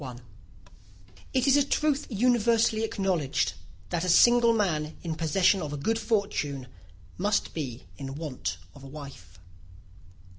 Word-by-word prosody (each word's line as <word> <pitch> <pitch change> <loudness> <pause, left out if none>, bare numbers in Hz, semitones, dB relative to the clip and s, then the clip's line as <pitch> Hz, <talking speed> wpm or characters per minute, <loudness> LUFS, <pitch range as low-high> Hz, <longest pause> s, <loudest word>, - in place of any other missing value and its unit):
] - - -26 0.5
It 260 -1 +1
is 275 -1 +5
a 285 - +5
truth 295 0 0
universally 230 -1 +2
acknowledged, 190 -9 0 0.4
that 175 -1 -1
a 185 - -1
single 240 +5 +6
man 160 -9 -1
in 165 -2 -2
possession 180 +4 +2
of 150 -2 -4
a - - -3
good 225 +11 0
fortune 200 - -1 0.5
must 205 +2 0
be 130 -7 -5 0.2
in 135 -1 -6
want 145 - -4 0.2
of 140 - -14
a - - -9
wife. 135 - -11
185 Hz, 140 wpm, -27 LUFS, 145-225 Hz, 0.5 s, single